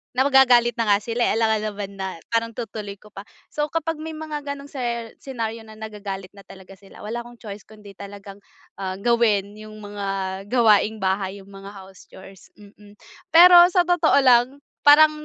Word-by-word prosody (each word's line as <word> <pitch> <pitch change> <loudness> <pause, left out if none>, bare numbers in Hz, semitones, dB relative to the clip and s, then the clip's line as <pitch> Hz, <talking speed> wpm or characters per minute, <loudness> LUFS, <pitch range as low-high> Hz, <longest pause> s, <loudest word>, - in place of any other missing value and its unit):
na 260 - +3
magagalit 250 -3 +4
na 230 - 0
nga 205 - +4
sila 235 +1 -1
eh - - 0
alam 220 -1 +1
naman 205 -2 -6
na 190 -1 -4 0.2
parang 230 0 0
itutuloy 215 -4 -7
ko 210 - -19
pa. 195 - -10 0.3
So 295 0 -2
kapag 325 0 -3
may 320 0 -7
mga 310 -2 -6
ganong 280 0 -7
ser 235 -4 -4
senaryo 230 -4 -6
na 215 - -13
nagagalit 205 -3 -8
na 200 -1 -16
talaga 190 0 -14
sila 200 0 -16
wala 225 +3 -5
akong 240 0 -11
choice 210 -3 -11
kundi 210 -2 -14
talagang, 200 0 -11 0.4
ah, 190 -1 -4
gawin 210 -2 0
yung 215 0 -11
mga 205 -1 -6 0.4
gawaing 220 -2 +2
bahay 190 +1 -2
yung 200 - -18
mga 195 0 -12
house 190 -1 -15
chores, 190 0 -15
mm. 205 0 -18 0.4
Pero 350 +1 +9
sa 360 -1 +2
totoo 345 -5 +2
lang, 255 +2 +3 0.2
parang, 305 +1 +8
220 Hz, 180 wpm, -22 LUFS, 200-255 Hz, 0.4 s, Pero